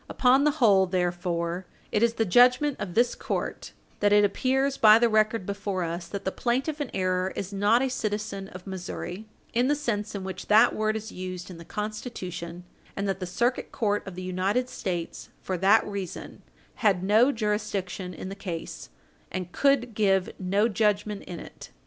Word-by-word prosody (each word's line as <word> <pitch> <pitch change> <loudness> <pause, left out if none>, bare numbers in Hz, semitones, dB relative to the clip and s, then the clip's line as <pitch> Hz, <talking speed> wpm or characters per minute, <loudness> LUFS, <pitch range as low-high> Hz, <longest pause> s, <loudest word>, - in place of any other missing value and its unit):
Upon 265 +2 +4
the - - +5
whole, 200 -8 +5
therefore, 175 -1 -1 0.2
it 210 - +1
is 235 0 +3
the 225 - +1
judgment 250 +8 +5
of 185 -4 -5
this 240 +1 +3
court - - -4 0.3
that 205 0 +3
it 205 0 +6
appears 265 +6 +1
by 215 -3 +7
the 235 +1 +4
record 215 -2 +2
before 200 -2 -2
us 170 +1 -4
that 200 +2 -6
the 190 - 0
plaintiff 270 +8 -1
in 280 - -3
error 185 0 0
is 200 +1 -5
not 210 +5 +3
a - - +1
citizen 210 -4 -3
of 185 -1 -11
Missouri 190 +2 -6 0.3
in 245 +2 +2
the 295 - +3
sense 215 -7 -2
in 195 - -4
which 190 -1 -6
that 215 +1 +6
word 215 0 0
is 220 +1 -5
used 185 0 -6
in 170 - -10
the - - -9
Constitution, 185 -5 -5 0.3
and 200 +1 -2
that 190 -1 -1
the 185 - -4
Circuit 240 +8 -1
Court 205 -2 0
of 190 - -7
the 185 - -6
United 190 +7 0
States, 175 -9 -4
for 185 - -3
that 200 +4 +5
reason, 200 -3 -6 0.4
had 195 -5 +2
no 220 +7 +5
jurisdiction 210 -5 -2
in 180 - -7
the - - -5
case, 165 -4 -6 0.4
and 185 -1 -5
could 265 -2 +2
give 195 -1 +2
no 200 +3 +2
judgment 210 -1 0
in 175 - -7
it. - - -11
205 Hz, 185 wpm, -27 LUFS, 185-225 Hz, 0.4 s, by